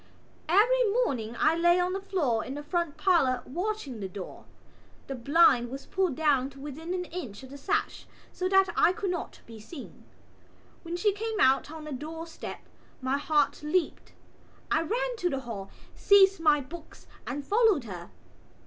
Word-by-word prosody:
Every 475 +8 +5 0.2
morning 230 - -3
I 320 - +3
lay 345 +1 +4
on 360 +1 0
the 390 - -3
floor 295 - 0
in 260 +3 -6
the 290 - -6
front 340 -1 -2
parlour 275 -10 +2
watching 345 - -4
her 195 - -3
door. 185 0 -9 0.6
The 270 - -5
blind 260 -1 +4
was 270 +2 -7
pulled 375 -7 0
down 280 -4 +2
to 275 0 -15
within 310 +5 -5
an 360 -1 -3
inch 265 - -7
of 260 - -11
the 280 - -8
sash - - -2 0.3
so 370 0 -2
that 385 0 +4
I 360 - +4
could 395 -2 -2
not 350 - -5
be 225 -1 -11
seen. 270 +7 -11 0.8
When 340 0 -5
she 410 +3 +2
came 440 +1 -3
out 265 -1 +4
on 315 0 -8
the 305 - -7
doorstep 320 +4 -7 0.4
my 265 +2 -1
heart 295 -1 +1
leaped. 315 +4 -1 0.6
I - - +3
ran - - -2
to 360 -4 0
the 270 -4 -2
hall, 210 -6 -7 0.2
seized 390 -1 +5
my 300 -3 +4
books 320 +5 -11 0.2
and 275 +3 -4
followed 420 - +3
her. 180 -6 -8
315 Hz, 175 wpm, -28 LUFS, 265-370 Hz, 0.8 s, Every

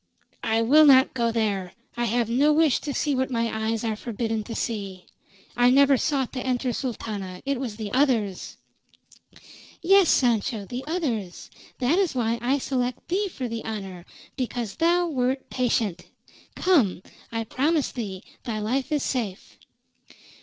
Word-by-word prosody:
"I 225 +1 +1
will 300 +6 +6
not 265 -1 +6
go 235 -2 0
there! 205 -5 -1 0.2
I 240 0 -1
have 235 0 +1
no 270 +6 +3
wish 305 -3 +3
to 290 - -4
see 290 +1 0
what 260 0 0
my 230 -3 -1
eyes 225 0 -1
are 220 -2 -1
forbidden 225 0 -3
to 230 - -6
see. 195 -5 -4 0.5
I 245 0 +5
never 275 +1 +5
sought 270 -1 -1
to 255 - -4
enter, 250 -1 -1
Sultana. 205 -8 -5
It 275 -2 -1
was 245 -5 -4
the 210 -2 -6
others!" 235 -9 0 1.2
"Yes, 385 0 +5
Sancho, 230 -3 +2
the 245 +6 -6
others. 245 - -3 0.3
That 270 +9 +2
is 370 -8 +1
why 235 -1 0
I 260 +4 +1
select 255 -2 -3
thee 395 +4 +1
for 265 -9 -5
the 230 -1 -5
honor, 195 -5 -6 0.3
because 240 -4 -4
thou 345 +2 +3
wert 265 -3 -1
patient. 225 -7 -1 0.5
Come. 250 - +2 0.3
I 225 0 -2
promise 290 +6 0
thee 200 -6 -6 0.2
thy 230 -4 -3
life 255 +7 -1
is 295 -2 +1
safe." 220 -6 -4
245 Hz, 155 wpm, -25 LUFS, 220-275 Hz, 1.2 s, will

